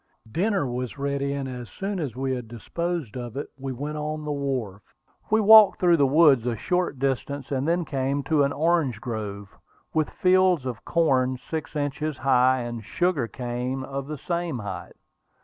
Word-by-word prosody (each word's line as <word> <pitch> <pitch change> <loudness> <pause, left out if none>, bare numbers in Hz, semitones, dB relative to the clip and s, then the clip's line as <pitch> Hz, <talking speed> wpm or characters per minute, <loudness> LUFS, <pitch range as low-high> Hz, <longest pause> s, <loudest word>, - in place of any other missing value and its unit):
Dinner 195 - +1
was 125 +1 -4
ready, 140 0 -1
and 140 -1 -3
as 125 -2 -7
soon 195 0 -4
as 140 -8 -3
we 130 0 -1
had 125 -3 -5
disposed 160 +4 -4
of 120 0 -6
it 145 - -4
we 135 0 -5
went 145 +4 -4
on 150 0 -4
the 150 - -2
wharf. 130 -9 -3 0.5
We 220 - +4
walked 215 -1 +8
through 175 -2 +4
the 140 -2 +4
woods 140 -4 +5
a 120 - 0
short 180 +3 -1
distance, 135 +1 -2
and 135 +1 -1
then 170 +1 +1
came 140 0 -1
to 155 0 +2
an 140 0 +2
orange 155 -6 +1
grove, 105 -4 -6 0.4
with 155 -1 +1
fields 185 -5 +3
of 125 -3 -5
corn 130 -6 +2
six 160 +3 -6
inches 150 0 -2
high, 130 -1 +3
and 120 -1 -5
sugar 175 - 0
cane 125 +2 -4
of 135 0 -5
the 150 0 -5
same 170 -3 -2
height. 100 -4 -7
140 Hz, 180 wpm, -25 LUFS, 125-160 Hz, 0.5 s, walked